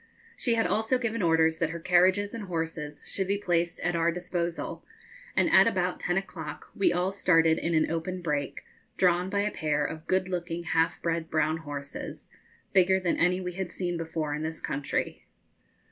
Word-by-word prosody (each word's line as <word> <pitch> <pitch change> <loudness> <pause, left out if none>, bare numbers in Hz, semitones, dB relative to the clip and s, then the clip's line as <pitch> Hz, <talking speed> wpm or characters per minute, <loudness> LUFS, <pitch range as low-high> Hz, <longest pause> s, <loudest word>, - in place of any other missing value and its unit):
She 235 -2 +1
had 225 - +2
also 220 +4 +2
given 230 -2 -2
orders 160 -1 +3
that 165 - +1
her 170 +1 -5
carriages 185 +4 +3
and 225 -3 -5
horses 160 -4 -4
should 190 -2 -2
be 200 +1 +1
placed 175 -4 0
at 175 -1 0
our 170 0 +2
disposal, 175 -1 -3 0.5
and - - +4
at - - +7
about 185 -4 0
ten 175 +1 0
o'clock 160 -6 -6
we 200 - +3
all 180 +2 +1
started 165 -4 +3
in 170 0 0
an 155 - +2
open 165 +3 -2
break, 145 -4 -2 0.4
drawn 180 0 +3
by 200 0 +1
a 210 +1 0
pair 150 -4 0
of 160 +1 -6
good 185 0 +1
looking 175 -2 -3
half 165 0 +1
bred 165 -1 -1
brown 155 0 +1
horses, 145 -3 -7 0.4
bigger 190 0 +5
than 180 -2 0
any 180 +1 +3
we 180 -1 -4
had 190 0 -3
seen 175 -1 -2
before 160 -2 -3
in 150 - -3
this 160 +1 -3
country. 145 0 -3
175 Hz, 185 wpm, -28 LUFS, 160-185 Hz, 0.5 s, at